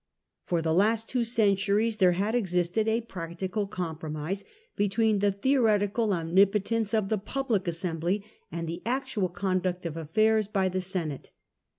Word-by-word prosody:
For 170 Hz, -2 st, 0 dB
the 160 Hz, -1 st, +1 dB
last 220 Hz, +5 st, +2 dB
two 250 Hz, -2 st, +1 dB
centuries 215 Hz, -1 st, +2 dB
there 185 Hz, -4 st, +5 dB
had 200 Hz, +5 st, -1 dB
existed 180 Hz, -1 st, +1 dB
a 225 Hz, +1 st, +2 dB
practical 190 Hz, 0 st, -4 dB
compi'omise 165 Hz, 0 st, -4 dB, 0.3 s
between 210 Hz, +1 st, +2 dB
the 205 Hz, 0 st, +3 dB
theoretical 215 Hz, -1 st, +2 dB
omnipotence 200 Hz, +5 st, +2 dB
of 210 Hz, -3 st, 0 dB
the 215 Hz, -, +1 dB
Public 220 Hz, -3 st, -2 dB
Assembly 170 Hz, +3 st, -1 dB, 0.3 s
and 165 Hz, 0 st, -4 dB
the 170 Hz, +2 st, -5 dB
actual 245 Hz, -5 st, -1 dB
conduct 185 Hz, 0 st, -1 dB
of 165 Hz, -2 st, -3 dB
affairs 215 Hz, +7 st, +2 dB
by 195 Hz, -3 st, +1 dB
the 185 Hz, +1 st, -2 dB
Senate. 175 Hz, -6 st, -3 dB
195 Hz, 145 wpm, -28 LUFS, 175-220 Hz, 0.3 s, there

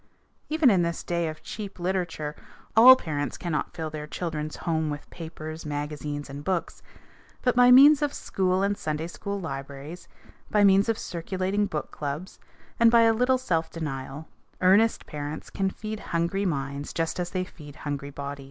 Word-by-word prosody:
Even 310 Hz, -5 st, +4 dB
in 185 Hz, -3 st, +3 dB
this 170 Hz, 0 st, -2 dB
day 170 Hz, -1 st, -1 dB
of 155 Hz, 0 st, -7 dB
cheap 205 Hz, -3 st, -7 dB
literature, 175 Hz, -4 st, -2 dB, 0.4 s
all 250 Hz, +4 st, +10 dB
parents 145 Hz, -, -3 dB
cannot 170 Hz, -4 st, -3 dB
fill 160 Hz, -1 st, -4 dB
their 150 Hz, 0 st, -6 dB
children's 155 Hz, -1 st, -4 dB
home 160 Hz, -2 st, -1 dB
with 145 Hz, 0 st, -6 dB
papers, 160 Hz, -1 st, -7 dB
magazines, 145 Hz, 0 st, -4 dB
and 140 Hz, +1 st, -8 dB
books, 185 Hz, 0 st, -2 dB, 0.6 s
but 250 Hz, -2 st, +2 dB
by 245 Hz, 0 st, +7 dB
means 280 Hz, +4 st, +8 dB
of 295 Hz, -1 st, +1 dB
school 185 Hz, -5 st, 0 dB
and 200 Hz, +1 st, +1 dB
Sunday 155 Hz, -5 st, -3 dB
school 200 Hz, +4 st, -5 dB
libraries, 140 Hz, +1 st, -7 dB, 0.4 s
by 210 Hz, -1 st, +3 dB
means 200 Hz, +2 st, +5 dB
of 225 Hz, -, +1 dB
circulating 190 Hz, +4 st, -2 dB
book 155 Hz, -6 st, -4 dB
clubs, 150 Hz, +6 st, -5 dB, 0.4 s
and 230 Hz, 0 st, +7 dB
by 235 Hz, 0 st, +6 dB
a 225 Hz, 0 st, +5 dB
little 250 Hz, +3 st, +3 dB
self 165 Hz, -10 st, -1 dB
denial, 145 Hz, -1 st, -5 dB, 0.3 s
earnest 200 Hz, +5 st, +4 dB
parents 150 Hz, +1 st, -6 dB
can 195 Hz, -1 st, 0 dB
feed 215 Hz, +2 st, -6 dB
hungry 170 Hz, +4 st, -1 dB
minds 140 Hz, -2 st, -3 dB
just 165 Hz, +2 st, -2 dB
as 175 Hz, -1 st, -2 dB
they 185 Hz, 0 st, -1 dB
feed 150 Hz, -5 st, -12 dB
hungry 145 Hz, -2 st, -4 dB
bodies. 140 Hz, 0 st, -6 dB
170 Hz, 170 wpm, -26 LUFS, 150-200 Hz, 0.6 s, all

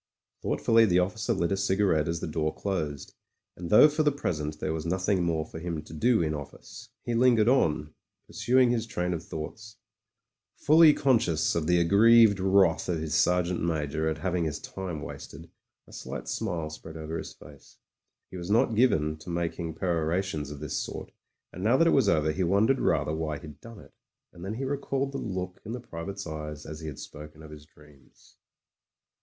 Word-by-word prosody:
Thoughtfully 115 Hz, 0 st, +3 dB
the 90 Hz, -2 st, +3 dB
officer 95 Hz, +3 st, 0 dB
lit 85 Hz, +1 st, 0 dB
a -, -, +2 dB
cigarette 95 Hz, -5 st, +1 dB
as 85 Hz, 0 st, -2 dB
the -, -, -3 dB
door 80 Hz, 0 st, -1 dB
closed, 80 Hz, -9 st, -4 dB, 0.4 s
and 85 Hz, -1 st, -7 dB
though 105 Hz, +8 st, +8 dB
for 150 Hz, +1 st, -1 dB
the 150 Hz, -1 st, +3 dB
present 75 Hz, -, -3 dB
there 80 Hz, -, -2 dB
was 80 Hz, -1 st, -4 dB
nothing 95 Hz, +3 st, 0 dB
more 80 Hz, -2 st, -1 dB
for 80 Hz, -, -9 dB
him 80 Hz, -2 st, -4 dB
to -, -, -13 dB
do 110 Hz, +4 st, +2 dB
in 80 Hz, -1 st, -1 dB
office, 95 Hz, -, -9 dB
he 120 Hz, -, -3 dB
lingered 115 Hz, -2 st, +4 dB
on, 75 Hz, -, +2 dB, 0.3 s
pursuing 120 Hz, +3 st, +2 dB
his 115 Hz, -2 st, -1 dB
train 90 Hz, -6 st, -2 dB
of 85 Hz, -1 st, -4 dB
thoughts. 105 Hz, +9 st, -8 dB, 0.8 s
Fully 155 Hz, +1 st, +6 dB
conscious 110 Hz, -, +2 dB
of 80 Hz, -2 st, -1 dB
the 90 Hz, 0 st, +3 dB
ag 85 Hz, -1 st, +1 dB
grieved 110 Hz, 0 st, +6 dB
wrath 95 Hz, -3 st, +3 dB
of 85 Hz, -, 0 dB
his 80 Hz, -1 st, -4 dB
Sergeant 90 Hz, 0 st, +2 dB
Major 80 Hz, -1 st, -1 dB
at 80 Hz, -, -3 dB
having 90 Hz, +1 st, -1 dB
his 75 Hz, -3 st, -2 dB
time 90 Hz, -5 st, -6 dB
wasted, -, -, -10 dB, 0.3 s
a -, -, -18 dB
slight -, -, -7 dB
smile 85 Hz, -8 st, -3 dB
spread 80 Hz, +1 st, -10 dB
over 80 Hz, +1 st, -5 dB
his -, -, -8 dB
face. 70 Hz, -1 st, -16 dB, 0.5 s
He 95 Hz, -, -7 dB
was 85 Hz, +1 st, -7 dB
not 115 Hz, +2 st, +3 dB
given 80 Hz, -10 st, +2 dB
to 80 Hz, +3 st, -11 dB
making 85 Hz, -1 st, -3 dB
perorations 85 Hz, -2 st, -1 dB
of 75 Hz, -1 st, -9 dB
this 75 Hz, -, -3 dB
sort, -, -, -5 dB, 0.4 s
and 90 Hz, -, -7 dB
now 120 Hz, +5 st, +4 dB
that 165 Hz, -, +4 dB
it 165 Hz, -, +4 dB
was 130 Hz, -8 st, +3 dB
over 80 Hz, -3 st, +2 dB
he 90 Hz, -, -3 dB
wondered 105 Hz, +9 st, +2 dB
rather 75 Hz, -, +1 dB
why 80 Hz, -1 st, -3 dB
he'd 75 Hz, -1 st, -12 dB
done 115 Hz, -1 st, -11 dB
it -, -, -16 dB, 0.4 s
And 85 Hz, -, -12 dB
then 100 Hz, +3 st, -4 dB
he 130 Hz, -, -4 dB
recalled 140 Hz, 0 st, -2 dB
the 135 Hz, -, -4 dB
look 90 Hz, -3 st, -5 dB
in 110 Hz, -, -6 dB
the 125 Hz, -, -4 dB
private's 100 Hz, -1 st, -7 dB
eyes 75 Hz, -2 st, -7 dB
as 80 Hz, 0 st, -8 dB
he 80 Hz, -, -7 dB
had 75 Hz, -, -7 dB
spoken 75 Hz, +1 st, -11 dB
of 80 Hz, -, -12 dB
his 75 Hz, -1 st, -12 dB
dreams. 75 Hz, -3 st, -22 dB
85 Hz, 195 wpm, -27 LUFS, 80-110 Hz, 0.8 s, though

